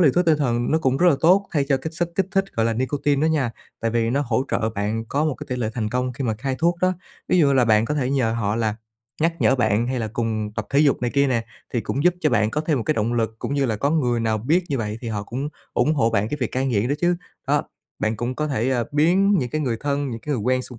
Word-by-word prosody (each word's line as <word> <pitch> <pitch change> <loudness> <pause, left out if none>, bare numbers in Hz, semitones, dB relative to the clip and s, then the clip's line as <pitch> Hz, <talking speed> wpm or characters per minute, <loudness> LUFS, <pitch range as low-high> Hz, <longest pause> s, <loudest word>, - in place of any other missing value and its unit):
liều 150 -7 +5
thuốc 180 +1 +3
tinh 155 -2 +4
thần 120 -4 0
nó 160 - +3
cũng 135 -3 +1
rất 180 +3 +4
là 145 - +4
tốt 190 +4 +4
thay 145 -3 +2
cho 135 - +3
cái 160 +4 -5
chất 175 -1 +1
kích 190 -2 +1
thích 195 0 +2
gọi 115 0 +2
là 115 - +1
nicotine 140 +4 0
đó - - +4
nha, 135 -6 +1 0.3
tại 115 - 0
vì 115 0 +1
nó 140 +3 +1
hỗ 120 +2 +1
trợ 110 0 0
bạn 105 +3 -2
có 145 +2 0
một 150 -4 0
cái - - -9
tỉ 125 - -2
lệ 115 -3 -1
thành 110 -3 -1
công 125 +2 -1
khi 135 +2 -4
mà 110 -2 0
cai 130 +4 -3
thuốc 170 +1 +2
đó. 185 0 +3 0.4
Ví 185 - +3
dụ 155 - +5
như 140 - +3
là 130 -2 +4
bạn 110 0 +4
có 150 - -2
thể 135 -3 0
nhờ 125 -5 +1
họ 110 -2 -1
là 110 -2 0 0.5
nhắc 165 0 +2
nhở 130 - +4
bạn, 115 -1 +2
hay 130 0 -1
là 110 - -2
cùng 110 -3 -2
tập 110 -2 -3
thể 140 - +3
dục 145 -4 +3
này 120 - 0
kia 140 0 +4
nè, 115 -3 0 0.3
thì 120 - 0
cũng 140 +7 -2
giúp 180 0 +5
cho 150 - +2
bạn 110 +1 +2
có 150 - -1
thêm 155 -2 0
một - - -2
cái 155 - +1
động 115 +2 0
lực, 115 -1 -1
cũng 140 - -3
như 140 -2 +1
là 110 -2 -1
có 140 +7 0
người 125 -7 +1
nào 110 -1 0
biết 160 - +1
như 135 -3 -1
vậy 105 0 -3
thì 120 - -5
họ 105 -2 -3
cũng 130 +7 -4 0.2
ủng 155 - +2
hộ 115 -6 +2
bạn 110 -1 +1
cái 150 - -3
việc 120 - -2
cai 130 +1 0
nghiện 115 -2 +1
đó 140 - +1
chứ. 175 0 +2 0.3
Đó, - - +3 0.4
bạn 110 0 -1
cũng 120 +3 -3
có 150 +2 -2
thể, 130 -1 0
ờ, 120 -3 +1
biến 185 +7 +3
những 125 -5 -2
cái 155 - -1
người 120 -6 -1
thân, 145 -1 -1
những 115 -1 -6
cái 150 -1 -2
người 110 - -2
quen 130 +2 +1
xung 125 -3 -9
130 Hz, 310 wpm, -23 LUFS, 115-150 Hz, 0.5 s, liều